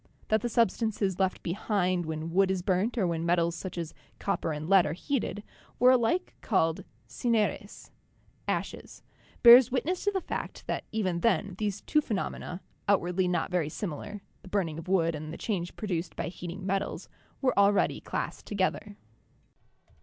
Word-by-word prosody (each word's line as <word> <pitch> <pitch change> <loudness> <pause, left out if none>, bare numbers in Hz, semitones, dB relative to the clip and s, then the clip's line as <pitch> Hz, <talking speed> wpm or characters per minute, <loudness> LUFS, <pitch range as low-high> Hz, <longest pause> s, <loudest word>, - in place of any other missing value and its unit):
That 220 0 +3
the 240 - -1
sub 230 -3 +3
stances 205 -5 -1
left 190 -1 0
behind 180 -2 0
when 160 +1 -4
wood 190 +2 +3
is 190 -2 -1
burnt 195 +7 +1
or 205 - +2
when 165 -2 -1
metals 170 0 +2
such 180 +2 -6
as 165 -2 -4 0.2
copper 165 - -1
and 150 +1 -4
lead 195 -1 +5
are 150 - -2
heated, 215 - -2 0.3
were 250 +1 +6
alike 255 +9 +2
called 165 -6 +1 0.2
"cineres" 210 - -1 0.6
(ashes), - - -4 0.4
bears 245 +1 +10
witness 305 +8 -1
to 410 - +3
the 385 - 0
fact - - -5
that - - -3
even 185 -6 0
then 200 -1 +1
these 205 -2 -2
two 305 - +2
phenomena, 195 -6 -4 0.3
outwardly 185 -2 +2
not 180 -1 0
very 175 -4 +1
similar, 195 +4 -5 0.2
the - - -14
burning 180 -5 -1
of 165 - -10
wood 170 -3 +2
and 155 0 -6
the - - -7
change 180 -6 -3
produced 175 -5 -3
by - - -3
heating 180 +2 -7
met 195 0 +1
als, - - -6 0.3
were 260 -2 +1
already 200 0 +3
classed - - -4
together. 205 +1 -1
190 Hz, 170 wpm, -29 LUFS, 170-215 Hz, 0.6 s, bears